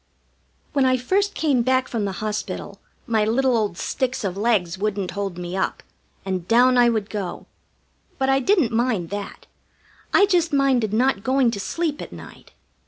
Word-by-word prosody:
When 280 Hz, -2 st, +2 dB
I 255 Hz, 0 st, +3 dB
first 400 Hz, +11 st, 0 dB
came 285 Hz, -6 st, +2 dB
back 255 Hz, +1 st, +1 dB
from 220 Hz, -4 st, -2 dB
the 195 Hz, -, -3 dB
hospital 210 Hz, -1 st, -4 dB, 0.3 s
my 225 Hz, -4 st, +1 dB
little 250 Hz, +4 st, +2 dB
old 210 Hz, -6 st, -1 dB
sticks 260 Hz, +3 st, -2 dB
of 190 Hz, -3 st, -2 dB
legs 200 Hz, -5 st, +1 dB
wouldn't 200 Hz, -2 st, -2 dB
hold 195 Hz, -1 st, -4 dB
me 175 Hz, +1 st, -5 dB
up, 190 Hz, -, -2 dB, 0.4 s
and 185 Hz, -2 st, -3 dB
down 250 Hz, +2 st, +5 dB
I 245 Hz, -1 st, +5 dB
would 220 Hz, -3 st, -1 dB
go. 200 Hz, -5 st, -5 dB, 0.7 s
But 265 Hz, -, 0 dB
I 270 Hz, 0 st, +3 dB
didn't 320 Hz, -, +2 dB
mind 225 Hz, -7 st, 0 dB
that. 205 Hz, 0 st, -6 dB, 0.7 s
I 400 Hz, -, +6 dB
just 350 Hz, -4 st, +1 dB
minded 265 Hz, -6 st, +2 dB
not 230 Hz, -1 st, +1 dB
going 260 Hz, -1 st, +2 dB
to 205 Hz, -, -5 dB
sleep 300 Hz, -, -2 dB
at -, -, -8 dB
night. -, -, -12 dB
235 Hz, 170 wpm, -22 LUFS, 200-265 Hz, 0.7 s, I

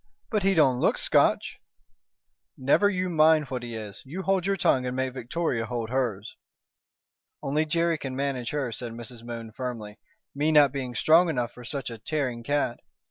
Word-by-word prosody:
"But 210 Hz, -2 st, +1 dB
he 195 Hz, 0 st, +2 dB
don't 135 Hz, -6 st, +4 dB
look -, -, +2 dB
Scotch." -, -, +2 dB, 1.0 s
"Never 140 Hz, +10 st, +3 dB
you 185 Hz, -2 st, -1 dB
mind 155 Hz, -4 st, +4 dB
what 125 Hz, -1 st, -3 dB
he 120 Hz, -1 st, -6 dB
is. 105 Hz, -3 st, -7 dB
You 170 Hz, +8 st, -6 dB
hold 190 Hz, -1 st, +1 dB
your 195 Hz, 0 st, +1 dB
tongue 130 Hz, -7 st, +2 dB
and 125 Hz, -, -3 dB
make 130 Hz, -1 st, -1 dB
Victoria 125 Hz, -2 st, -2 dB
hold 120 Hz, -1 st, -4 dB
hers." 115 Hz, -6 st, -2 dB, 1.1 s
"Only 150 Hz, +3 st, 0 dB
Jerry 165 Hz, 0 st, +1 dB
can 130 Hz, -2 st, -5 dB
manage 135 Hz, -3 st, -2 dB
her," 140 Hz, -5 st, -2 dB
said 115 Hz, 0 st, -5 dB
Mrs. 120 Hz, 0 st, -9 dB
Moon, 115 Hz, -1 st, -7 dB
firmly, 115 Hz, -4 st, -6 dB, 0.3 s
"me 150 Hz, +3 st, +1 dB
not 145 Hz, -3 st, +6 dB
being 130 Hz, -3 st, -4 dB
strong 165 Hz, +7 st, +5 dB
enough 125 Hz, -6 st, -1 dB
for 125 Hz, -, -12 dB
such 135 Hz, 0 st, -4 dB
a 115 Hz, -, -8 dB
tearing 125 Hz, -1 st, -2 dB
cat. 145 Hz, -1 st, -1 dB
130 Hz, 180 wpm, -26 LUFS, 120-155 Hz, 1.1 s, not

